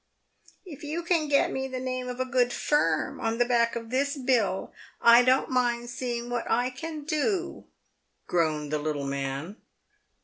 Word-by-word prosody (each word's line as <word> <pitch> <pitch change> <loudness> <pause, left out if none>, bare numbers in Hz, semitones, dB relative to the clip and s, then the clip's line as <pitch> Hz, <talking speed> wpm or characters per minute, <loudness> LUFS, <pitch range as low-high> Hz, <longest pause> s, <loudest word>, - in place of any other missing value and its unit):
"If 315 -6 -10
you 315 +3 -3
can 335 -3 +1
get 285 -1 +3
me 265 0 -2
the 260 -1 -5
name 255 0 -3
of 250 0 -6
a 255 - 0
good 250 -2 +2
firm 165 - 0
on 225 -1 -1
the 240 - +3
back 235 -1 +2
of 230 0 -6
this 280 +3 0
bill, 240 -8 0 0.3
I 235 +1 +7
don't 255 +2 +2
mind 240 -1 0
seeing 240 -2 -3
what 240 -1 -2
I 245 +2 +1
can 305 +3 -6
do," 340 +4 -1 0.6
groaned 155 -4 0
the 150 - +1
little 145 -2 -2
man. 140 +7 -4
245 Hz, 170 wpm, -27 LUFS, 225-270 Hz, 0.6 s, I